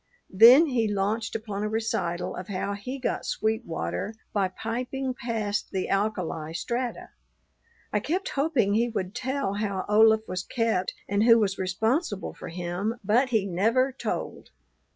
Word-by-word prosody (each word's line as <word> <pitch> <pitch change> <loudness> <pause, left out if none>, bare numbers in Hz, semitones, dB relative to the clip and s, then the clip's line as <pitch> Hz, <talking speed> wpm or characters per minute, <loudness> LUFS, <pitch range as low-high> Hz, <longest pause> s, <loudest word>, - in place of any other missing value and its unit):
Then 240 - +8
he 235 -7 0
launched 210 +3 -1
upon 210 -2 -4
a 210 - -1
recital 195 -6 -2
of 180 - -7
how 200 0 -2
he 225 +7 -5
got 265 - -2
sweet 220 +2 -1
water 90 - -3 0.2
by 200 -2 +2
piping 250 +6 -3
past 225 -5 -2
the 190 -2 -2
alkali 185 -6 -1
strata. 240 +7 -3 0.8
I 210 - +3
kept 345 - -2
hoping 275 -8 +1
he 235 +3 +2
would 190 -4 -3
tell 260 -3 -2
how 200 -2 -2
Olaf 220 +1 +5
was 185 0 -3
kept 220 -2 -1
and 200 +1 +1
who 230 -1 +8
was 200 -3 0
responsible 205 - -1
for - - -9
him, 180 +6 -3
but 235 +7 +3
he 220 -5 +1
never 225 +9 +2
told. 260 - -5
215 Hz, 155 wpm, -27 LUFS, 195-235 Hz, 0.8 s, Then